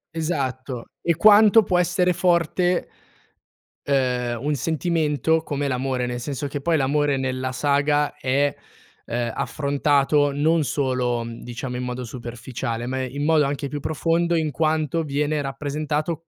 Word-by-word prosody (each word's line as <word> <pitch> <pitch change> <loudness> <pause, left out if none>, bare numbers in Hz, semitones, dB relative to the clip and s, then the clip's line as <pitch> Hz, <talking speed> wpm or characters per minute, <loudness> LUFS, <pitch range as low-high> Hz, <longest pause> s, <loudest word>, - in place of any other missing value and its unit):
Esatto. 130 -6 -3 0.2
E 170 -2 +1
quanto 215 +3 +7
può 180 -2 +1
essere 180 +1 +2
forte 175 0 +1 1.0
ehm, 125 -4 0
un 150 - +1
sentimento 160 +2 0
come 145 -2 -2
l'amore, 130 -1 -1
nel 120 0 -3
senso 145 +2 -4
che 140 0 -5
poi 165 +2 +2
l'amore 145 0 +1
nella 130 0 -2
saga 145 +2 +1
è, 140 0 0 0.5
ehm, 120 -1 -2
affrontato 145 0 +1
non 155 +3 +2
solo, 125 -3 -1
mhmm, 115 0 -8
diciamo 125 +1 -5
in 125 - -3
modo 125 0 -4
superficiale, 120 0 -5
ma 130 +1 -2
in 140 +3 -3
modo 155 -1 +4
anche 140 0 -2
più 145 +1 -5
profondo 170 +2 0
in 155 -2 0
quanto 155 +2 0
viene 150 +1 -1
rappresentato 150 +3 -3
145 Hz, 140 wpm, -23 LUFS, 130-160 Hz, 1.0 s, quanto